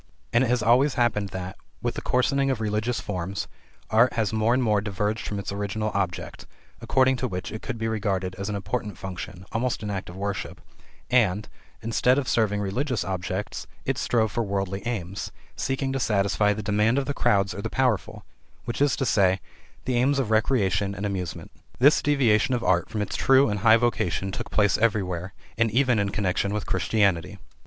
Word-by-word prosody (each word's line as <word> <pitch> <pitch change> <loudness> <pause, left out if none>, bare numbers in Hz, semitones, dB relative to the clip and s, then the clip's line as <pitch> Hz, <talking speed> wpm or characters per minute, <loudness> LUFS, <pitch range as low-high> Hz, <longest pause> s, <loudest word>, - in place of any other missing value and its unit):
And 120 +2 +4
it - - +1
has 125 -2 +1
always 125 +5 +4
happened 105 -5 +1
that, 95 0 -6 0.3
with 120 0 0
the - - -5
coarsening 135 +2 +1
of 130 -4 0
religious 110 +2 -1
forms, 95 0 -4 0.4
art 115 +3 +5
has 110 -2 0
more 110 +1 +2
and 130 - +1
more 105 -3 +2
diverged 105 +1 -2
from 105 - -3
its 100 - -4
original 105 +2 -2
object 95 -4 -3 0.3
(according 130 0 +3
to 130 - -1
which 90 -5 -5
it 110 - -6
could - - -4
be 115 0 -2
regarded 100 -4 -1
as 100 +2 -3
an 105 - -2
important 100 +2 -3
function 95 -1 -7
almost 115 0 -1
an 105 - -3
act 95 -3 -4
of 90 - -9
worship), 100 0 -4 0.5
and, 105 -5 +3 0.4
instead 125 +3 +2
of 140 -3 -1
serving 105 -3 +1
religious 120 +4 -1
objects, 95 +2 -4 0.2
it - - 0
strove 110 -3 +1
for 120 - -1
worldly 100 -2 -2
aims, 100 -5 -4 0.2
seeking 135 +1 -2
to 135 - -1
satisfy 105 -2 +2
the 105 +1 -3
demands 105 +4 +2
of 140 - +1
the 145 - -2
crowd 100 -6 +2
or - - -9
of 100 - -5
the - - -2
powerful, 125 -7 -1 0.4
i.e., 115 -7 +2 0.5
the 130 - 0
aims 135 +4 +3
of 125 -5 -1
recreation 105 -4 +1
and 100 +2 -4
amusement. 95 -4 -4 0.3
This 140 +5 +5
deviation 130 -4 +3
of 120 - -3
art 85 -2 +2
from 105 -2 -2
its 100 - -5
true 135 0 +4
and 105 0 -1
high 110 +2 +6
vocation 95 -6 0
took - - -5
place 105 -2 +2
everywhere, 95 -5 0 0.2
and 115 -1 +3
even 125 0 +2
in 100 0 +1
connection 100 0 -1
with 105 - -3
Christianity. 95 -2 +1
105 Hz, 190 wpm, -25 LUFS, 100-120 Hz, 0.5 s, high